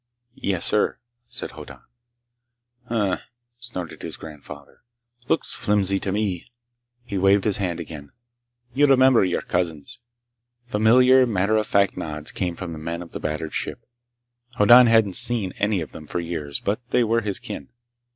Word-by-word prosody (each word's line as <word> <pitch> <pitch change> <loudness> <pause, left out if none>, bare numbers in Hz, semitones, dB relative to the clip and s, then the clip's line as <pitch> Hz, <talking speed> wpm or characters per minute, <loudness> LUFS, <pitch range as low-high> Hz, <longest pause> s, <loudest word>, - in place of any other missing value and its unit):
"Yes, 95 -7 -2
sir," 105 - +1 0.3
said - - -5
Hoddan. - - -11 1.1
"Hm - - -15
m 100 -4 +1
m," - - -2 0.4
snorted 105 -8 -7
his - - -5
grandfather. 75 -2 -12 0.5
"Looks - - +3
flimsy 100 -2 +1
to 95 - -3
me!" 100 0 -2 0.5
He 100 -5 -4
waved 95 +1 +4
his 105 -3 +2
hand 90 -4 -2
again. 75 -4 -9 0.6
"You 145 +3 +4
remember 130 -3 +5
your 90 -2 -1
cousins." 90 +6 -3 0.7
Familiar, 125 +3 +5
matter 100 -1 +1
of 110 -1 +1
fact 100 -1 +2
nods 75 -1 -3
came 90 -3 -3
from 85 -1 -6
the 80 - -8
men 85 +2 -5
of 85 - -15
the - - -6
battered 75 0 -4
ship. - - -4 0.7
Hoddan 120 +3 +7
hadn't 110 -5 +3
seen 110 -7 +1
any 100 -2 +1
of 80 - -7
them 75 - -11
for 85 - -3
years, 80 -4 -4
but 105 +3 -2
they 125 - +3
were 115 +1 +1
his 105 -3 -3
kin. 70 - -8
100 Hz, 160 wpm, -23 LUFS, 85-110 Hz, 1.1 s, Hoddan